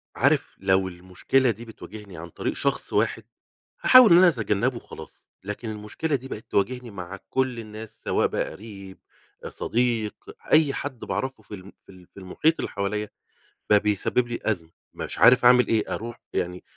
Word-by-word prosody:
عارف - - +1
لو 95 0 +2
المشكلة 95 +8 0
دي 115 +3 -9
بتواجهني 105 -4 -11
عن 85 +2 -8
طريق - - -3
شخص - - -2
واحد، - - +1 0.6
هاحاول 255 -5 +8
إن 170 - +9
أنا 185 - +7
أتجنبه 120 - 0
وخلاص، 120 - -11 0.2
لكن 105 +3 -5
المشكلة 110 +9 -3
دي 130 0 -5
بقت 110 -4 -9
تواجهني 125 +4 -1
مع 95 0 -7
كل 130 -3 -1
الناس 110 0 -10
سواء - - +1
بقى - - -3
قريب، 100 -3 -11 0.5
صديق، 115 -3 -1 0.4
أي 155 -3 +5
حد 130 -4 -5
باعرفه 130 -2 -4
في 105 - -9
ال 95 0 -12
في - - -15
ال 90 -2 -17
في - - -12
المحيط 150 - 0
اللي - - -3
حواليَّ 105 +1 -2 0.6
بقى 105 - +6
بيسبب 105 +4 0
لي 120 0 -4
أزمة، 90 -7 -2 0.2
مش - - -6
عارف 125 +1 +6
أعمل 125 -1 +6
إيه، 110 -2 0
أروح 120 +2 -6
يعني 90 +1 -3
110 Hz, 170 wpm, -25 LUFS, 100-125 Hz, 0.6 s, إن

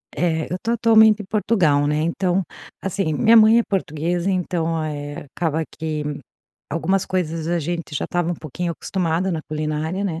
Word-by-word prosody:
É, 160 -3 -1
eu 180 - -1
tô 230 - -1
atualmente 220 -2 +5
em - - -9
Portugal, 190 -9 +2
né. 150 +1 +1
Então, 180 +3 0 0.4
assim, 190 -4 -1
minha 225 +9 +5
mãe 220 +2 +7
é - - +2
portuguesa, 175 -1 -1
então, 165 -3 -1
eh, 145 -1 -5
acaba 160 -2 0
que 155 -1 -4 0.7
algumas 185 +5 0
coisas 165 -3 -2
a 175 0 +1
gente 165 0 -4
já - - -1
estava 175 -1 -1
um 175 - -1
pouquinho 165 +3 -4
acostumado 180 +1 -1
na 160 - -2
culinária, 155 +5 -2
né. 165 -4 -2
170 Hz, 170 wpm, -21 LUFS, 155-190 Hz, 0.7 s, mãe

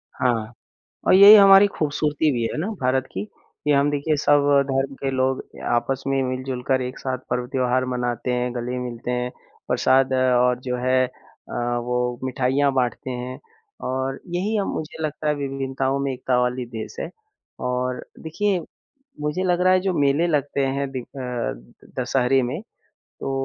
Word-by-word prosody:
हाँ 115 -3 0 0.6
और - - +6
ये 200 +2 +9
ही 215 - +12
हमारी 195 0 +8
ख़ूबसूरती 150 -2 0
भी 120 -2 -1
है - - -5
ना 185 - -1
भारत 130 +1 +1
की, 95 - -4
कि 150 +6 -6
हम 140 +1 +4
देखिए 145 +2 0
सब 145 0 +4 0.3
धर्म 135 +1 0
के 135 0 -3
लोग 130 0 0 0.2
अ, - - -10
आपस 130 +3 0
में 135 0 +1
मिल-जुल 130 0 -3
कर 130 -1 +2
एक 125 0 -5
साथ 130 -1 -2
पर्व-त्योहार 125 0 0
मनाते 125 0 -2
हैं, 125 0 -1
गले 125 +1 -3
मिलते 125 -1 -5
हैं, 125 0 -2 0.4
प्रसाद 130 0 +3
और 125 -1 +3
जो 125 -1 -1
है 130 +1 +2
अ, 125 - -17 0.2
वो 125 0 -1
मिठाइयाँ 130 +2 +1
बाँटते 130 0 -1
हैं। 125 +1 -5 0.5
और 130 +1 -2
यही 190 +5 -1
अ, 200 - +1
मुझे 160 +1 -5
लगता 150 0 -3
है 150 - +3
विभिन्नताओं 135 -1 -2
में 140 0 -1
एकता 125 0 0
वाली 125 0 -1
देश 110 -2 -7
है। - - -4 0.5
और 125 0 -2
देखिए 190 +4 -1 0.6
मुझे 150 +5 -1
लग 180 -1 +1
रहा 185 0 +5
है 185 - +4
जो 190 0 0
मेले 145 +4 +3
लगते 145 -3 0
हैं 140 +1 -1
दि 130 - -4
अ, 120 - -7
दशहरे 130 +1 +2
में 125 +7 -3 0.6
तो - - -3
130 Hz, 170 wpm, -23 LUFS, 125-145 Hz, 0.6 s, ही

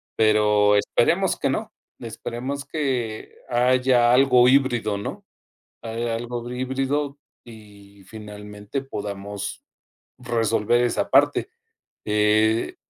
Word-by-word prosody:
pero 105 -1 +3
esperemos 100 - +1
que - - -1
no, - - -3 0.3
esperemos 130 +4 -5
que 130 -7 -3
haya 125 0 +3
algo 125 -1 +5
híbrido, 120 -6 +2
¿no?, 100 - -7 0.6
haya 115 0 -3
algo 120 +1 -5
híbrido 135 +3 -2 0.3
y 100 -3 -15
finalmente 105 +3 -8
podamos 100 -5 -6 0.6
resolver 115 -1 +1
esa 120 - -1
parte, 145 - +3 0.6
eh, 105 +1 +2
115 Hz, 95 wpm, -23 LUFS, 105-130 Hz, 0.6 s, algo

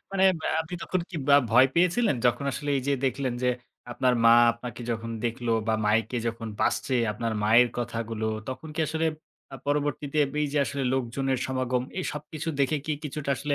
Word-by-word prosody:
মানে, 190 -1 +3 0.2
ব্যা - - -1
আপনি 160 +2 -8
তখন 185 - -1
কি 175 - -6
বা 140 - +8
ভয় 125 +3 +7
পেয়েছিলেন? 180 - +3
যখন 120 +3 +1
আসলে 145 +1 -3
এই 135 - -1
যে 140 - +3
দেখলেন 130 -1 -1
যে 125 - +3 0.4
আপনার 125 0 +2
মা 115 - +8 0.2
আপনাকে 120 0 -8
যখন 115 0 -3
দেখলো 120 0 -2 0.2
বা 110 - +3
মাইকে 115 +4 +1
যখন 115 0 -3
বাজছে 135 - +1 0.2
আপনার 115 +2 -3
মায়ের 115 +3 +5
কথাগুলো, 115 -2 -3 0.2
তখন 130 +5 -6
কি 160 - -2
আসলে 160 +2 -1 0.5
আ - - -5
পরবর্তীতে 145 0 -1 0.2
এই 150 - +2
যে 150 - +1
আসলে 140 +2 -3
লোকজনের 130 +1 -1
সমাগম, 130 -1 -1 0.2
এই 185 - -2
সবকিছু 150 +2 -6
দেখে 140 +3 +2
কি 155 - 0
কিছুটা 145 -1 -4
আসলে 145 +2 -1
130 Hz, 185 wpm, -27 LUFS, 120-150 Hz, 0.5 s, বা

